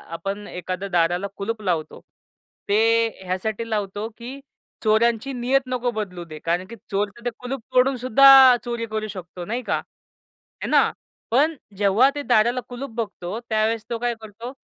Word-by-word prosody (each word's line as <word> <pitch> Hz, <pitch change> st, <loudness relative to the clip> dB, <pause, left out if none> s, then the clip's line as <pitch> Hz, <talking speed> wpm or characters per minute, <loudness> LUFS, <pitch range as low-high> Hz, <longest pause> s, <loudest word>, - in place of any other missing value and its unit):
आपण 195 Hz, +4 st, -5 dB
एखाद्या 185 Hz, +2 st, -5 dB
दाराला 175 Hz, +3 st, +1 dB
कुलूप 215 Hz, +2 st, -3 dB
लावतो. 170 Hz, -6 st, -2 dB, 0.7 s
ते 225 Hz, +2 st, +4 dB, 0.2 s
ह्यासाठी 215 Hz, +5 st, -3 dB
लावतो, 205 Hz, 0 st, -2 dB
की 255 Hz, +4 st, -8 dB, 0.4 s
चोरांची 230 Hz, +4 st, +2 dB
नियत 255 Hz, +3 st, +1 dB
नको 250 Hz, -1 st, -1 dB
बदलू 190 Hz, -6 st, -5 dB
दे, 155 Hz, -2 st, -9 dB
कारण 175 Hz, +2 st, 0 dB
की 230 Hz, -, -8 dB, 0.2 s
चोरचं 205 Hz, +4 st, -2 dB
ते -, -, +2 dB
कुलूप 250 Hz, 0 st, -5 dB
तोडूनसुद्धा 260 Hz, 0 st, +7 dB
चोरी 235 Hz, -1 st, -3 dB
करू 215 Hz, 0 st, -2 dB
शकतो, 180 Hz, -3 st, -8 dB
नाही 235 Hz, +5 st, -3 dB
का? -, -, -1 dB, 0.8 s
है -, -, -2 dB
ना. -, -, +4 dB, 0.4 s
पण 295 Hz, +7 st, +3 dB, 0.2 s
जेव्हा 205 Hz, +6 st, +4 dB
ते 290 Hz, -, -3 dB
दाराला 240 Hz, 0 st, +3 dB
कुलूप 250 Hz, +1 st, -6 dB
बघतो, 210 Hz, -3 st, -4 dB
त्यावेळेस 220 Hz, 0 st, 0 dB
तो 230 Hz, -, -2 dB
काय 240 Hz, 0 st, -1 dB
करतो, 220 Hz, +3 st, -9 dB
220 Hz, 150 wpm, -23 LUFS, 200-245 Hz, 0.8 s, तोडूनसुद्धा